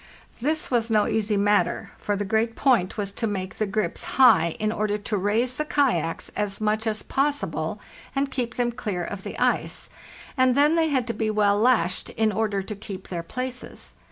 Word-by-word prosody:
This 310 +3 +1
was 235 -2 +2
no 215 -2 +3
easy 215 -1 0
matter, 205 +1 +1
for 205 - -1
the 205 +1 -2
great 225 +2 0
point 235 -10 +2
was 200 -1 -3
to 225 - -1
make 190 -2 -4
the 215 - +1
grips 215 +2 -2
high 210 -11 +6
in 215 0 0
order 210 -1 -1
to 210 +1 -3
raise 220 +6 +1
the 305 - 0
kayaks 275 - 0
as 205 -2 -3
much 215 +1 0
as 215 -1 -1
possible 285 +1 -1 0.4
and 275 0 0
keep 245 -3 -2
them 240 -1 0
clear 200 -6 -3
of 200 +2 -5
the - - -6
ice; - - 0 0.4
and 255 -2 +3
then 295 +3 +5
they 325 -1 +3
had 260 -4 +1
to 230 - -3
be 220 -1 -1
well 205 -1 +2
lashed 220 -6 +2
in 220 -1 +1
order 205 -2 -1
to 210 +2 -6
keep 195 -2 -8
their 175 -2 -3
places. 255 +8 -6
220 Hz, 195 wpm, -25 LUFS, 205-250 Hz, 0.4 s, high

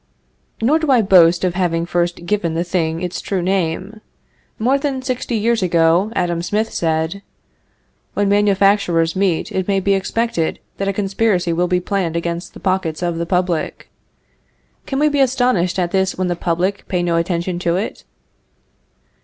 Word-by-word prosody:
Nor 295 +7 +3
do 315 -2 -2
I 250 -4 +5
boast 180 -3 +5
of 180 -2 +1
having 170 -2 0
first 175 0 -1
given 175 -4 -1
this 170 +1 -3
thing 165 -1 0
its 180 0 -3
true 190 -3 -2
name. 190 +3 -2 0.6
More 260 +5 +2
than 275 -2 -2
sixty 255 -2 -2
years 230 +1 +1
ago, 170 +3 +2
Adam 175 -2 0
Smith 210 +5 -1
said: 160 +3 -1 0.9
"When 205 0 +1
manufacturers 200 -4 +2
meet 185 -4 0
it 190 -1 -2
may 195 -1 +2
be 195 +1 +1
expected 195 -2 -1 0.2
that 195 - -2
a 195 - 0
conspiracy 195 -3 0
will 175 +2 +1
be 180 0 +1
planned 180 -3 -2
against 170 +1 -4
the - - -9
pockets 185 -4 -1
of 170 -1 -1
the 170 - -2
public." 180 -3 -1 1.0
Can 270 - -2
we 300 +2 +3
be 290 -1 0
astonished 245 -9 +2
at 175 -2 0
this 190 -1 0
when 185 -1 -1
the 175 - 0
public 175 +4 -1
pay 180 -2 -1
no 170 -1 +1
attention 175 +1 -1
to 170 -1 0
it? 195 +4 -4
185 Hz, 170 wpm, -19 LUFS, 170-205 Hz, 1.0 s, I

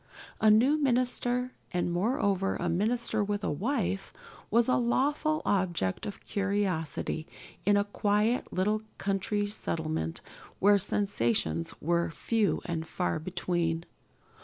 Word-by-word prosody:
A 220 - +5
new 255 +8 +5
minister, 250 -1 +1 0.2
and 175 -1 0
moreover 195 -1 +1
a 175 - -2
minister 220 +5 +1
with 205 0 -2
a - - 0
wife, 195 - -1 0.4
was 235 +2 +3
a 255 - +3
lawful 290 +6 +1
object 175 - 0
of 205 - -8
curiosity 190 -6 -1 0.4
in 205 0 +5
a 200 - +3
quiet 210 +3 +1
little 210 +3 +1 0.2
country 200 +1 0
settlement 160 - -3 0.4
where 205 +1 +5
sensations 115 - 0
were 170 +2 +1
few 215 +5 0
and 160 -1 -3
far 180 -3 -1
between. 170 -1 -1
200 Hz, 120 wpm, -29 LUFS, 175-225 Hz, 0.4 s, A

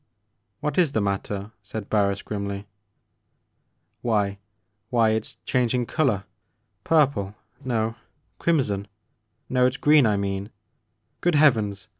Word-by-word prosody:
" 100 +2 -50
What 150 +2 0
is 160 -6 +3
the - - +2
matter? 100 +1 -2
" - - -48
said 105 0 -6
Barris 100 -2 +1
grimly. 100 -1 -4 0.7
" - - -48
Why 100 -4 0 0.3
— 105 +3 -49
^why— 115 -3 +4
it 110 - -2
's - - -11
changing 125 -1 +1
color 125 - +1 0.3
— 105 -2 -48
^purple, 135 -11 +2 0.3
no, 115 -3 -1 0.4
crimson 110 -12 +1 0.3
— 110 0 -24
^no, 125 -1 +4
it 130 - -2
's - - -6
green 150 -4 +5
I 105 -1 +2
mean 100 0 -2 0.4
— - - -48
good 175 -2 +2
Heavens 110 -10 +3
110 Hz, 155 wpm, -25 LUFS, 100-125 Hz, 0.7 s, green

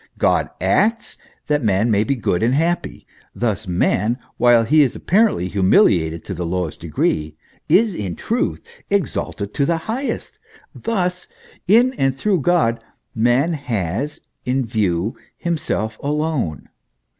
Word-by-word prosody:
God - - +2
acts, 230 +2 +1 0.3
that 145 -2 0
man 105 +2 +2
may 105 0 +3
be 135 +5 0
good 100 -7 -1
and 120 +4 +2
happy. 170 +4 -1 0.3
Thus 110 -3 -2
man, 100 +6 +1 0.2
while 120 -2 +5
he 150 +7 +4
is 135 -5 +2
apparently 200 - +2
humiliated 85 -4 +3
to 95 - -5
the 90 0 -4
lowest 90 -1 -3
degree, 80 -1 -1 0.3
is 215 0 +4
in 95 - -4
truth 235 +2 -2 0.3
exalted 135 - -2
to 140 - 0
the 165 +4 +1
highest. 255 +5 -4 0.3
Thus, 180 -5 -2 0.4
in 240 +6 +5
and 135 -1 +2
through 190 +5 +1
God, 130 -9 +2 0.3
man 120 +8 +2
has 120 - -3 0.2
in 130 +1 0
view 105 -3 -1 0.2
himself 110 -10 -2
alone. 145 - -2
120 Hz, 135 wpm, -20 LUFS, -, 0.4 s, while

